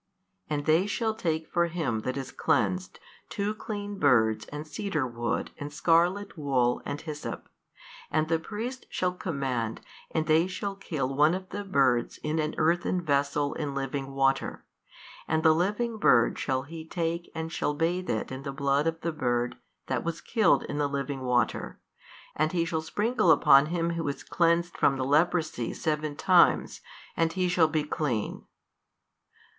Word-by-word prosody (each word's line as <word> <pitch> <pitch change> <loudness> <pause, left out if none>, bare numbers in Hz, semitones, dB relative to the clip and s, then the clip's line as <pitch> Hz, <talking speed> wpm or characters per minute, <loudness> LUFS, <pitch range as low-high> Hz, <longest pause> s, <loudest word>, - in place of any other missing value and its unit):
And 145 -1 -2
they 160 +5 +3
shall 220 +1 0
take 160 -6 -2
for 170 0 +1
him 160 -10 -2
that 130 +4 -3
is 135 -1 -5
cleansed 185 +4 0 0.3
two 205 +1 -2
clean 205 -2 -6
birds 110 - +3
and 150 +1 -6
cedar 155 -2 -2
wood 120 -2 -2
and 145 0 -5
scarlet 175 +7 +2
wool 130 -6 +1
and 145 - -3
hyssop, 150 -2 -6 0.6
and 155 0 +1
the 165 0 +1
priest 230 +8 -6
shall 180 -1 0
command 135 - -2 0.3
and 160 -1 -1
they 160 +2 +4
shall 195 +1 -5
hill 135 -5 -2
one 150 +5 +4
of 185 0 -7
the 205 +1 -4
birds 135 -10 +2
in 155 +1 -1
an 155 0 -1
earthen 175 +3 +2
vessel 145 0 +1
in 145 -3 -4
living 135 0 -3
water, 135 0 0 0.6
and 160 0 +1
the 160 -1 +6
living 210 +7 0
bird 120 - +4
shall 130 -1 -1
he 160 +3 -8
take 170 +1 -3
and 160 0 -4
shall 150 - -1
bathe 170 +4 -1
it 110 - -2
in 130 0 -5
the 140 0 -5
blood 140 +2 +1
of 165 0 -2
the 170 - -1
bird 125 -5 -1 0.3
that - - -2
was 170 0 -3
killed 225 -3 +2
in 145 - -4
the 145 -1 +1
living 140 -1 -3
water 125 -2 0 0.6
and 155 +2 0
he 170 -2 +1
shall 160 -1 -1
sprinkle 215 +4 +1
upon 140 -2 +6
him 170 0 -1
who 165 -2 -3
is 140 - -4
cleansed 170 0 +1
from 135 - +2
the 130 - -1
leprosy 155 -3 +1
seven 150 -1 -2
times, - - +3 0.3
and 165 0 +1
he 185 -1 +1
shall 175 -2 +4
be 155 -1 0
clean. 145 -7 -2
155 Hz, 170 wpm, -28 LUFS, 140-175 Hz, 0.6 s, the